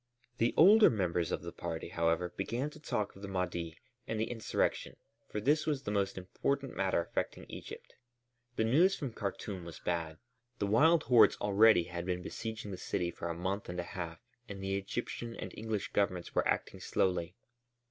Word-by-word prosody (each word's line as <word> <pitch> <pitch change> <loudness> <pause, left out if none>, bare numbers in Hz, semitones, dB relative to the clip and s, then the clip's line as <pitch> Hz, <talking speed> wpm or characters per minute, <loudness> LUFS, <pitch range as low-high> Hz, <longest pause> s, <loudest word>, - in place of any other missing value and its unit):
The 115 - +2
older 210 +6 +8
members 90 -6 0
of - - -2
the - - -5
party, 80 - -5
however, 85 +1 0
began 120 +9 -2
to 155 - -13
talk 105 -8 -2
of 95 - -13
the 100 - -5
Mahdi 85 -3 -3 0.3
and 110 - -2
the 110 - -1
insurrection, 115 -2 -1 0.3
for 105 - -3
this 150 +8 +2
was 145 -3 0
the 105 - -3
most 100 -2 0
important 135 +8 -2
matter 95 -2 +1
affecting 85 - -3
Egypt. - - -9 0.6
The - - +1
news 165 +12 +4
from 135 -6 -5
Khartûm 100 -2 -4
was 85 -1 -8
bad. 80 -2 -2 0.4
The 100 - 0
wild 155 +11 +5
hordes 115 -5 +6
already 105 -2 +5
had 85 +1 -6
been 90 -1 -1
besieging 110 0 -5
the 95 - -5
city 85 -1 -2
for 85 - -5
a 85 - -2
month 95 +4 -3
and 90 0 -4
a - - -1
half 85 -3 -5 0.3
and 100 -1 -6
the 95 0 -1
Egyptian 115 +3 -4
and - - -6
English 110 -2 -3
governments 90 -3 0
were - - +2
acting - - -1
slowly. 90 -1 0
100 Hz, 185 wpm, -33 LUFS, 90-115 Hz, 0.6 s, older